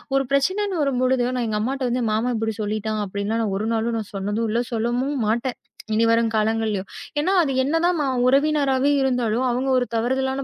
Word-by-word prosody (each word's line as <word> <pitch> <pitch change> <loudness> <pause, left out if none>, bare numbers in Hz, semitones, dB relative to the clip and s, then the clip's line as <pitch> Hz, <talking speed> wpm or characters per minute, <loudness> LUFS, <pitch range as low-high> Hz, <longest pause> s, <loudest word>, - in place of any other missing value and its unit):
ஒரு 270 - +3
பிரச்சனை 280 +8 +2 0.3
வரும்பொழுது 255 -2 +1
நான் 245 -2 -1
எங்க 210 - -1
அம்மாட்ட 255 -1 -1
"மாமா 225 +3 0
இப்படி 220 0 -1
சொல்லிட்டான்." 215 +1 -2
அப்படின்னு 205 +4 -2
ஒரு 210 - -2
நாளும் 230 +1 0
நான் 210 - -8
சொன்னதும் 205 +4 -1
இல்ல. 230 - +1
சொல்லவும் 240 +4 -1
மாட்டேன். 240 +3 -1 0.4
இனி 225 +1 +3
வரும் 230 0 +2
காலங்களிலேயும். 215 -2 0 0.3
ஏன்னா 355 +6 +1
அது 295 -5 0
என்னதான் 330 +4 +1 0.3
உறவினராவே 275 0 +3
இருந்தாலும், 250 -2 +1
அவங்க 255 +3 -1
ஒரு 250 - +1
தவறான 265 +3 0
240 Hz, 160 wpm, -22 LUFS, 220-270 Hz, 0.4 s, ஒரு